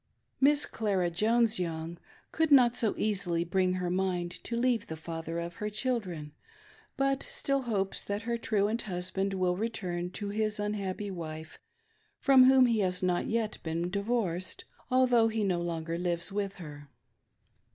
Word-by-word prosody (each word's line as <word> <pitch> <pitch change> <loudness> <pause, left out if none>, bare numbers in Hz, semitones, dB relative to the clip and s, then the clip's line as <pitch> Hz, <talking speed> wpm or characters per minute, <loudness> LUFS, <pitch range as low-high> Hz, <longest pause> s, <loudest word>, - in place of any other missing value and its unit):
Mrs. 290 +2 +4
Clara 195 -6 0
Jones 225 +4 +2
JToung 165 -1 -4 0.3
could 320 -1 +1
not 245 -4 +6
so 225 -4 +1
easily 185 -5 0
bring 185 +1 +1
her 180 -1 -2
mind 180 -2 -1
to 235 - -3
leave 240 -3 +1
the 160 - -6
father 165 +1 -5
of 170 0 -5
her 210 - -3
children, 210 - -2 0.7
but 275 0 +1
still 275 0 -1
hopes 205 -6 -1
that 205 +2 -3
her 235 0 -1
truant 220 0 0
husband 190 +2 -1
will 180 -1 +1
return 180 -5 -3
to 205 +2 -4
his 215 0 -1
unhappy 205 -1 -3
wife, 160 -3 -7 0.6
from 265 -2 +6
whom 260 0 +7
he 230 -3 +2
has 185 -2 0
not 180 -1 +1
yet 225 -1 -1
been 170 +2 -2
divorced, 200 -4 -2 0.2
although 250 -3 +4
he 220 -1 -1
no 180 -3 0
longer 165 -1 -3
lives 175 0 -1
with 200 -1 -2
her. 145 -5 -10
195 Hz, 155 wpm, -30 LUFS, 175-230 Hz, 0.7 s, whom